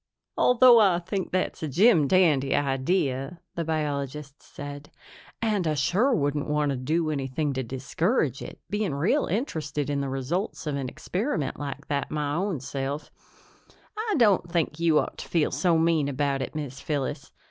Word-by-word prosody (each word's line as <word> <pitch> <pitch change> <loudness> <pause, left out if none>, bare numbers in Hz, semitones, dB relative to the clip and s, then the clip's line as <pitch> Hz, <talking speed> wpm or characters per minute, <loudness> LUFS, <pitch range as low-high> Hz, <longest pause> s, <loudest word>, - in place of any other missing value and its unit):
"Although 250 -1 +6
I 195 -5 +5
think 185 +2 -3
that's 185 0 -1
a 160 - -2
jim 170 - +4
dandy 150 -6 +3
idea," 135 +1 0
the 170 - -2
biologist 150 -2 -3
said, 145 0 -9 0.5
"and 210 -6 +1
I 155 - +1
sure 185 - +2
wouldn't 145 - 0
want 150 -1 +1
to - - -1
do 155 +5 0
anything 140 +1 -2
to 130 - -2
discourage 135 - -1
it, - - -8
being 205 -8 -1
real 190 - +1
interested 150 - -2
in 140 -1 0
the 140 - -2
results 135 +11 -3
of 150 -2 -2
an 135 -2 -3
experiment 180 - -3
like 145 0 -5
that 140 -1 -2
my 150 -2 -2
own 180 -3 -1
self, 140 +2 -4 0.8
I 435 0 -1
don't 200 -8 +3
think 165 -2 0
you 165 -2 +3
ought - - -1
to - - -8
feel 165 -3 +1
so 175 -3 +2
mean 160 -3 +2
about 140 0 -1
it, 130 - -5
Miz 140 -3 -5
Phyllis. 145 -4 -3
150 Hz, 170 wpm, -26 LUFS, 140-180 Hz, 0.8 s, Although